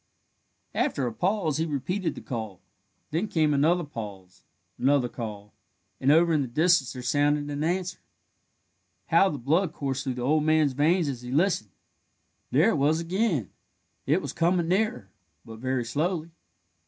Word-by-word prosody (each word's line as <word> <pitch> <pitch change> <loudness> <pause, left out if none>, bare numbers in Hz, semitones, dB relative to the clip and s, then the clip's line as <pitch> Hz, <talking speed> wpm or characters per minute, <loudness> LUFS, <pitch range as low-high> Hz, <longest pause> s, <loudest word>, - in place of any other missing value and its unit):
After 135 - 0
a 120 - -3
pause 180 - 0
he 160 - 0
repeated 165 +6 -2
the - - -8
call; 110 -7 -5 0.5
then 170 +8 0
came 155 -5 +2
another 165 +5 +3
pause, 100 - -9 0.4
another 135 -1 +3
call, 105 -4 -7 0.5
and 135 - +3
over 165 +2 +5
in 150 - +2
the 135 - -2
distance 150 -1 +2
there 125 - -7
sounded 145 +2 +1
an 145 +1 -2
answer. 180 +2 -1 1.1
How 195 - +5
the 150 - -4
blood 155 +7 +1
coursed 135 -4 -3
through 130 -2 -3
the 125 - -4
old 150 +4 +2
man's 155 -3 +3
veins 160 +5 +2
as 130 -4 -4
he 125 - -8
listened! 155 - +1 0.8
There - - +4
it - - 0
was 150 +4 +2
again. 170 - -1 0.6
It 155 +7 +2
was - - -5
coming 170 0 +1
nearer, 185 - 0 0.3
but 110 -1 -10
very 130 0 -1
slowly. 160 +6 -2
150 Hz, 160 wpm, -27 LUFS, 125-170 Hz, 1.1 s, over